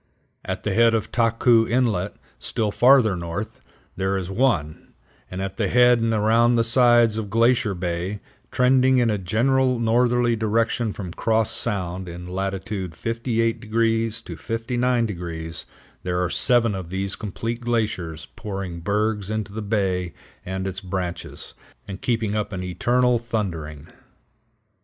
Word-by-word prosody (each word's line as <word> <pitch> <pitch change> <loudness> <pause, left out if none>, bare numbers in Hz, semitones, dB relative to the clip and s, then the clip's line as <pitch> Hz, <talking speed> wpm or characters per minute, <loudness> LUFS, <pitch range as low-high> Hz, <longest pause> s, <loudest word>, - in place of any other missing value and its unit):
At - - -4
the - - -1
head 115 0 +4
of 110 - +1
the - - -17
Tahkoo 115 0 +3
Inlet, 110 -6 0 0.2
still 110 -2 -2
farther 120 -4 +5
north, 85 +4 -5 0.3
there 95 +1 0
is 95 0 -4
one; 95 - -1 0.3
and 95 +1 -4
at 95 0 -5
the 110 -3 +1
head 125 +3 +5
and 115 0 0
around 115 +2 +3
the 115 - +3
sides 120 -2 +4
of 105 -2 -5
Glacier 115 -1 +2
Bay, 90 +3 -3 0.3
trending 130 +1 +4
in 120 -3 +3
a 105 - -1
general 125 +7 +1
northerly 120 +1 +2
direction 115 +1 0
from 90 -4 -7
Cross 110 +1 +1
Sound 95 -4 -1
in 90 +1 -8
latitude 95 0 -4
58° 115 +1 0
to - - -8
59°, 115 -9 -2 0.4
there 90 -1 -2
are 90 - -2
seven 120 -4 +3
of 95 -3 -6
these 95 +1 -2
complete 115 +3 -5
glaciers 105 -10 -2
pouring 95 -4 -5
bergs 105 +2 -1
into 110 -2 -3
the 110 - -4
bay 95 -4 -1 0.3
and 95 +1 -4
its 95 -1 -4
branches, 90 -2 -5 0.3
and 95 -1 -7
keeping 115 -5 0
up 105 0 -2
an 95 -2 -4
eternal 120 +6 +1
thundering. 85 -11 -4
110 Hz, 145 wpm, -23 LUFS, 95-115 Hz, 0.4 s, farther